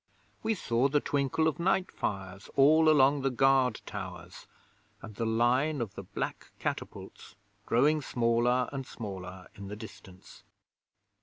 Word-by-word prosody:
We 220 0 0
saw 120 - +1
the 145 +1 +2
twinkle 145 +3 0
of 160 - -1
night 185 +1 +1
fires 95 -1 -5
all 155 +3 +6
along 140 -1 +4
the 135 - +1
guard 130 -1 +2
towers, - - -8 0.5
and 110 - -10
the 115 +3 -2
line 125 +7 +2
of 110 -4 -4
the 100 - -7
black 95 - -5
catapults - - -6 0.3
growing 150 +6 +3
smaller 120 0 +1
and 135 -1 -3
smaller 95 -4 -8
in 100 -1 -9
the 105 - -6
distance. 95 -3 -13
125 Hz, 140 wpm, -30 LUFS, 110-145 Hz, 0.5 s, all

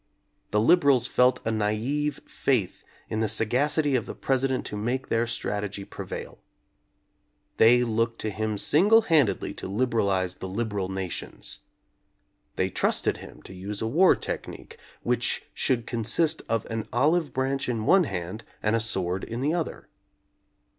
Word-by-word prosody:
The 105 - +2
liberals 135 -1 +4
felt 125 -1 +2
a 115 - +1
naive 115 +8 -1
faith 120 -9 -1 0.2
in 110 - -3
the 110 - +1
sagacity 135 +7 +2
of 120 - -1
the - - -6
President 135 -1 0
to - - -5
make 120 +5 -2
their 115 +1 +2
strat 105 -3 -3
egy 100 -1 -6
prevail. - - -7 1.2
They 120 +2 +6
looked 115 0 0
to 110 - -2
him 110 +1 -2
single 200 - +5
handedly 150 - +2
to - - -6
liberalize 100 -4 0
the 95 - -6
liberal 100 -2 -2
nations. 95 -2 -3 1.0
They - - 0
trusted - - +1
him - - -12
to - - -11
use 100 +2 -5
a 110 - -2
war 165 +12 +5
technique - - -7 0.2
which 120 -1 0
should 120 -3 0
consist 120 +8 0
of 115 -2 0
an 110 -1 -3
olive 150 +4 +2
branch 135 +1 -1
in 115 -3 -2
one 190 +4 +5
hand 95 +1 -5 0.2
and 105 +1 +2
a - - +2
sword 95 -5 -1
in 115 +1 -5
the 150 +4 +1
other. 170 -2 -3
115 Hz, 155 wpm, -26 LUFS, 105-135 Hz, 1.2 s, They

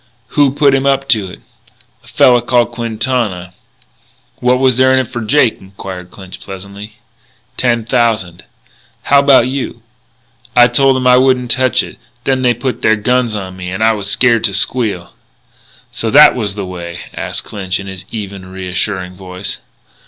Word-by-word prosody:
"Who 145 -2 +2
put 140 0 +2
him 135 0 +1
up 135 0 +1
to 105 -5 +1
it?" - - -12 0.6
"A - - -20
fella 120 -1 +4
called 120 0 +1
Quintana." 115 -5 -2 0.8
"What 125 +1 +2
was 130 -2 +2
there 130 0 +4
in 130 - +4
it 130 - -3
for 120 - -4
Jake?" 120 +1 +1
inquired 95 -1 -9
Clinch 95 0 -12
pleasantly. 100 +2 -10 0.6
"Ten 120 -3 0
thousand." 110 -8 0 0.6
"How 140 - +4
about 140 -3 +5
you?" 130 -3 -5 0.7
"I 120 -1 +6
told 135 +2 +3
'em 130 - -3
I 125 0 +6
wouldn't 125 -2 +2
touch 130 0 +2
it. - - -11 0.2
Then 130 -1 0
they 125 -1 +2
pulled 125 +2 -4
their 110 - +3
guns 120 +1 0
on 95 -2 -6
me, 90 -1 -7
and 95 +4 -3
I 115 0 +4
was 100 -2 -4
scared 120 0 +3
to 100 -3 0
squeal." 100 -5 -1 0.8
"So 115 - -3
that 145 +5 +7
was 105 -5 -3
the 100 -2 -4
way?" 85 -1 -7
asked - - -5
Clinch 95 -2 -4
in 100 - -8
his 95 -1 -8
even, 100 -4 -7
reassuring 95 0 -4
voice. 90 +1 -7
115 Hz, 170 wpm, -14 LUFS, 95-130 Hz, 0.8 s, that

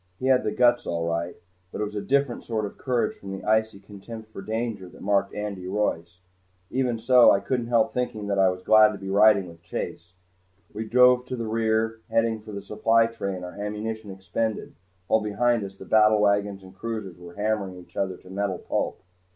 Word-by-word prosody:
He 130 - -5
had 130 -1 +4
the - - -1
guts 120 0 +3
all 85 -1 -1
right. 85 +1 -2 0.4
But - - -6
it - - 0
was 105 0 -4
a 105 - -3
different 140 -1 0
sort 110 -2 -2
of 100 - -9
courage 125 -3 0
from 95 0 -8
the 95 - -7
icy 110 -1 +1
contempt 105 +3 -11
for 95 - -8
danger 110 -2 -3
that - - -16
marked 100 0 +1
Andy 100 -3 -5
Royce. 90 -3 -2 0.5
Even 125 -2 0
so, 120 +2 +6
I 100 - +5
couldn't 120 +1 -2
help 115 -2 +2
thinking 120 -4 -2
that 100 -1 0
I 95 -1 +5
was 90 0 -5
glad 110 +1 +6
to - - -6
be 95 -1 -6
riding 100 -1 +5
with 85 -1 -14
Chase. 85 +1 -6 0.6
We 110 +2 -4
drove 125 +2 +5
to 130 - -3
the 115 -2 -4
rear, 110 0 0
heading 115 -1 +1
for 110 0 -10
the 100 -1 -6
supply 115 +2 +3
train, 100 -5 -4
our 90 - -7
ammunition 105 +1 -5
expended, 100 +3 -3 0.3
while 110 - +2
behind 115 +2 +1
us 95 0 -7
the 95 - -11
battlewagons 105 -2 +3
and 95 0 -13
cruisers 105 -4 -6
were 85 -1 -12
hammering 105 -2 -1
each 90 -1 -15
other 95 -2 -2
to - - -17
metal 100 -1 -1
pulp. - - -3
105 Hz, 205 wpm, -25 LUFS, 95-115 Hz, 0.6 s, so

